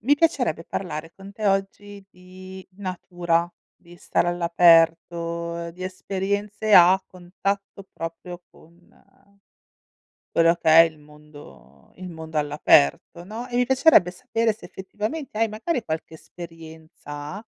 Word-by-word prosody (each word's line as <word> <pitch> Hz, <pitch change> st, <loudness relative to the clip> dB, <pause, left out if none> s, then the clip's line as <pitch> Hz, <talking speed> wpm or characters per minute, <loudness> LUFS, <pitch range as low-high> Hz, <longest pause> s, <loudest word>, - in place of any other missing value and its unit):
Mi 275 Hz, +7 st, +3 dB
piacerebbe 250 Hz, -, 0 dB
parlare 165 Hz, -3 st, -6 dB
con 195 Hz, +1 st, -12 dB
te, 210 Hz, +1 st, -4 dB
oggi, 200 Hz, +1 st, -2 dB
di 185 Hz, +1 st, -13 dB
natura, 175 Hz, -3 st, -2 dB, 0.2 s
di 175 Hz, 0 st, -18 dB
stare 175 Hz, -, -1 dB
all'aperto, 170 Hz, 0 st, +2 dB
di 180 Hz, +2 st, -11 dB
esperienze 200 Hz, +3 st, -2 dB
a 185 Hz, +2 st, +7 dB
contatto 195 Hz, +2 st, -5 dB
proprio 170 Hz, +2 st, -8 dB
con 170 Hz, +2 st, -23 dB, 1.3 s
quello 165 Hz, 0 st, +3 dB
che 170 Hz, -2 st, -1 dB
è 160 Hz, -, +8 dB
il 165 Hz, -2 st, -4 dB
mondo 145 Hz, -, -17 dB
il 185 Hz, 0 st, -8 dB
mondo 160 Hz, -2 st, -7 dB
all'aperto, 145 Hz, -, +2 dB
no, 225 Hz, +5 st, -7 dB
e 245 Hz, -, -6 dB
mi 250 Hz, -, +3 dB
piacerebbe 260 Hz, -, +4 dB
sapere 230 Hz, +2 st, -1 dB
se, 215 Hz, -, -14 dB
effettivamente, 215 Hz, +7 st, -6 dB
hai 225 Hz, +1 st, +2 dB
magari 235 Hz, +4 st, -3 dB
qualche 160 Hz, -1 st, -5 dB
esperienza, 160 Hz, +1 st, -10 dB
175 Hz, 125 wpm, -23 LUFS, 165-200 Hz, 1.3 s, è